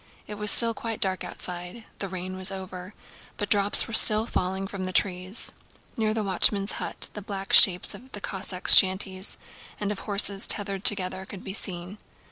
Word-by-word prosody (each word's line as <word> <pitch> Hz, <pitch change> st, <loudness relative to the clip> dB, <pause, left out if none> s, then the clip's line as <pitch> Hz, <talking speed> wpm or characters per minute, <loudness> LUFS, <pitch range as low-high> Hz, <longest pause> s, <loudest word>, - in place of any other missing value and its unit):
It -, -, -10 dB
was 210 Hz, 0 st, -4 dB
still 230 Hz, +1 st, +5 dB
quite 225 Hz, -1 st, -8 dB
dark 190 Hz, -1 st, -3 dB
outside. 180 Hz, +5 st, -8 dB, 0.2 s
The 195 Hz, -, -5 dB
rain 185 Hz, 0 st, -8 dB
was 190 Hz, +1 st, -4 dB
over, 185 Hz, 0 st, -11 dB, 0.4 s
but 205 Hz, -, -6 dB
drops 205 Hz, -1 st, +1 dB
were 230 Hz, -, -11 dB
still 215 Hz, 0 st, +4 dB
falling 190 Hz, -3 st, -5 dB
from 195 Hz, -1 st, -8 dB
the 185 Hz, -, -6 dB
trees. 185 Hz, +2 st, -3 dB, 0.4 s
Near 220 Hz, -1 st, -2 dB
the 220 Hz, 0 st, -4 dB
watchman's 195 Hz, +1 st, +3 dB
hut -, -, +1 dB
the 210 Hz, -, -9 dB
black 195 Hz, -1 st, -9 dB
shapes 180 Hz, -2 st, +8 dB
of 260 Hz, +2 st, -16 dB
the 205 Hz, -, -8 dB
Cossacks' 190 Hz, -2 st, +2 dB
shanties 190 Hz, 0 st, 0 dB, 0.4 s
and 205 Hz, 0 st, -4 dB
of 205 Hz, -, -8 dB
horses 200 Hz, -1 st, -1 dB
tethered 200 Hz, -2 st, -3 dB
together 190 Hz, -2 st, +3 dB
could 195 Hz, -3 st, -12 dB
be 190 Hz, -, -9 dB
seen. 185 Hz, 0 st, -6 dB
195 Hz, 180 wpm, -23 LUFS, 185-210 Hz, 0.4 s, shapes